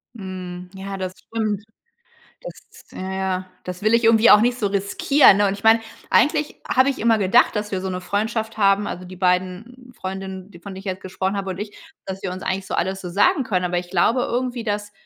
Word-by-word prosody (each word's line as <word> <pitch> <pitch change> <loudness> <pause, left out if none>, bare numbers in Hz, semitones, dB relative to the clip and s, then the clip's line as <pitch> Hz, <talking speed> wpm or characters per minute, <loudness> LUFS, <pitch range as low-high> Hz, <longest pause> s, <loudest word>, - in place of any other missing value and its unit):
Mhm. 185 -3 -7
Ja, 195 0 -6
das 185 -1 -4
stimmt, 215 -3 -3 0.8
das - - -12
ja, 190 +1 -5
ja, 190 -1 -2 0.2
das 180 +1 -7
will 215 +1 +3
ich 230 0 +3
irgendwie 225 0 +6
auch 210 - +8
nicht 240 +2 +2
so 210 -5 0
riskieren, 200 +5 +4
ne, 205 -1 +3
und 195 - -1
ich 200 +2 -11
meine, 225 +1 +6 0.3
eigentlich 300 +1 +2
habe 260 +1 +4
ich 275 - -5
immer 225 0 +3
gedacht, 215 +5 +3
dass 210 0 -3
wir 190 - -1
so 190 - -3
'ne 180 0 -3
Freundschaft 220 +4 -2
haben 200 -1 +3
also, 180 - -5
die 185 +1 -10
beiden 185 +8 -2
Freundinnen, 190 0 -6
die 170 - -14
von 200 +3 -9
denen 190 - -8
ich - - -16
jetzt 190 -1 -4
gesprochen 190 +1 -2
habe, 195 -1 -3
und 185 - -5
ich, 205 0 -6 0.3
dass 190 0 -6
wir 190 - -3
uns 185 +1 -7
eigentlich 190 0 -2
so - - -4
alles 190 0 -1
so 180 - -6
sagen 270 - +3
können, 185 -7 -1
aber 175 0 0
ich 175 0 -7
glaube 220 +7 +2
irgendwie, 245 0 -2
dass 205 -1 -3
195 Hz, 225 wpm, -22 LUFS, 185-225 Hz, 0.8 s, auch